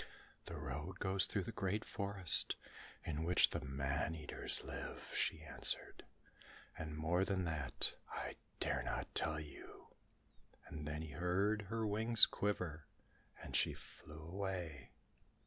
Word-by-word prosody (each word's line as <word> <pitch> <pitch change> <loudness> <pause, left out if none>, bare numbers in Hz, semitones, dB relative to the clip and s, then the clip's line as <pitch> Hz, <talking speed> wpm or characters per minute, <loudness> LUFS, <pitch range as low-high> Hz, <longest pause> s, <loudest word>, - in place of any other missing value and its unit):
"The 85 - -6
road 75 +5 -5
goes 95 0 +4
through 100 - -1
the - - -5
great 100 +3 -1
forest, 100 -3 +4 0.5
in 80 -1 -2
which 90 +2 +5
the 85 - -1
man 70 +3 -1
eaters 75 -2 0
live," - - -6
she 80 - +1
answered, 75 - 0 0.7
"and 80 -2 -5
more 85 +4 +2
than 95 -2 0
that, 80 -5 +1 0.2
I - - -4 0.2
dare - - +1
not - - -3
tell 75 -1 +1
you." 75 -1 -11 0.8
And 75 -1 -6
then 75 +1 -3
he 80 - -7
heard 95 +7 +1
her 115 0 -1
wings 110 +2 +6
quiver, 90 -7 -2 0.6
as - - -5
she - - +3
flew 75 0 -12
away. 90 -4 -4
85 Hz, 135 wpm, -39 LUFS, 75-95 Hz, 0.8 s, wings